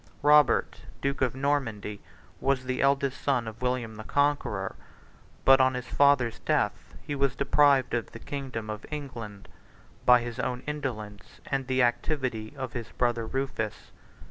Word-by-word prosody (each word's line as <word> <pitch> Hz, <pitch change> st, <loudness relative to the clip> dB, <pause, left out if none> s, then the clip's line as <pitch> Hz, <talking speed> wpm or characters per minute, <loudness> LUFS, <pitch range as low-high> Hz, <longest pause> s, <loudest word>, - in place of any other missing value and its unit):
46 -, -, -27 dB
Robert, 150 Hz, 0 st, +4 dB, 0.2 s
duke 140 Hz, 0 st, -2 dB
of 125 Hz, -2 st, +1 dB
Normandy, 125 Hz, -7 st, -1 dB, 0.4 s
was 135 Hz, -1 st, +1 dB
the 130 Hz, 0 st, -1 dB
eldest 140 Hz, -1 st, +1 dB
son 125 Hz, -5 st, +1 dB
of 110 Hz, +2 st, -8 dB
William 125 Hz, -3 st, -2 dB
the 110 Hz, -, -7 dB
Conqueror; 145 Hz, +4 st, 0 dB, 0.7 s
but 135 Hz, 0 st, +7 dB
on 130 Hz, 0 st, +3 dB
his 125 Hz, -1 st, -4 dB
father's 130 Hz, -3 st, +3 dB
death -, -, -1 dB
he 145 Hz, -, -4 dB
was 140 Hz, -2 st, +1 dB
deprived 140 Hz, -2 st, +3 dB
of 120 Hz, -2 st, -1 dB
the -, -, -9 dB
kingdom 130 Hz, -3 st, -5 dB
of 105 Hz, -1 st, -5 dB
England, 120 Hz, -9 st, -7 dB, 0.6 s
by 125 Hz, -1 st, +6 dB
his 120 Hz, +1 st, -6 dB
own 125 Hz, 0 st, -2 dB
indolence 115 Hz, -9 st, -5 dB
and 135 Hz, -2 st, -2 dB
the 130 Hz, -1 st, +2 dB
activity 120 Hz, -2 st, -1 dB
of 130 Hz, -4 st, -5 dB
his 115 Hz, -2 st, -5 dB
brother 120 Hz, -2 st, 0 dB
Rufus. 130 Hz, -5 st, -3 dB
130 Hz, 155 wpm, -28 LUFS, 115-140 Hz, 0.7 s, but